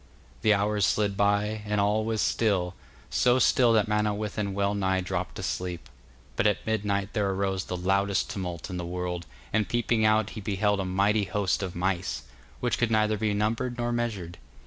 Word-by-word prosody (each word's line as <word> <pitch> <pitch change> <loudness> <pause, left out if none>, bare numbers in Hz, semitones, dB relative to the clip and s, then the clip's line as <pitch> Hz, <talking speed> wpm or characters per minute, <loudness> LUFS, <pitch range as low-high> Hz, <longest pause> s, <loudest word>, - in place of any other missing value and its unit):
The 110 -1 +5
hours 105 +1 +1
slid 100 0 +2
by, 105 +2 +1
and 105 0 -1
all 105 +2 +2
was 110 -1 -1
still, 95 -5 +1 0.4
so 125 0 +4
still 125 -1 +4
that 110 -2 +3
Manawyddan 105 -1 -1
well 100 0 +1
nigh 95 -2 +1
dropped 95 0 -3
asleep. 90 -4 -4 0.5
But 105 - +3
at 105 - 0
midnight 100 -2 -1
there 105 -3 +1
arose 95 -1 -1
the 90 - -4
loudest 95 +2 +1
tumult 90 -3 -5
in 90 - -4
the 90 - -3
world, 90 0 -4 0.3
and 110 -1 +1
peeping 120 -1 +1
out 110 -1 +3
he 110 - -7
beheld 105 +1 +1
a 95 - -1
mighty 100 +3 +2
host 100 0 0
of 95 -3 -4
mice, 90 -7 -1 0.4
which - - 0
could 120 - +2
neither 110 -1 +2
be 105 -1 0
numbered 115 +4 -1
nor 120 0 -1
measured. 105 -8 -3
100 Hz, 180 wpm, -27 LUFS, 95-110 Hz, 0.5 s, The